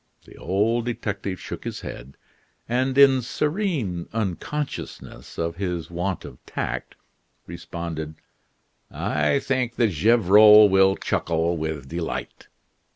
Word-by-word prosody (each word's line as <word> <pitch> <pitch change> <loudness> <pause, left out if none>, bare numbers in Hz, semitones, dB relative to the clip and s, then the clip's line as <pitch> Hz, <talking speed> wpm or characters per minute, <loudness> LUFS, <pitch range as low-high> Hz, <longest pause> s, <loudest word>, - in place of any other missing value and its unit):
The - - -15
old 110 +6 0
detective 100 -6 -4
shook - - -7
his - - -5
head, 65 +3 -9 0.5
and 130 +3 0
in 135 -2 +6
serene 145 - -2
unconsciousness 115 - -5
of 85 0 -2
his 90 -4 -3
want 90 +2 -3
of 60 - -12
tact, - - -4 0.5
responded: 85 -2 -6 0.7
"I 75 - 0
think 130 -3 -1
that 115 -4 +2
Gevrol 105 +3 +7
will 95 0 +4
chuckle 85 -1 -1
with 80 -4 -4
delight." 85 +3 -5
95 Hz, 110 wpm, -24 LUFS, 85-120 Hz, 0.7 s, Gevrol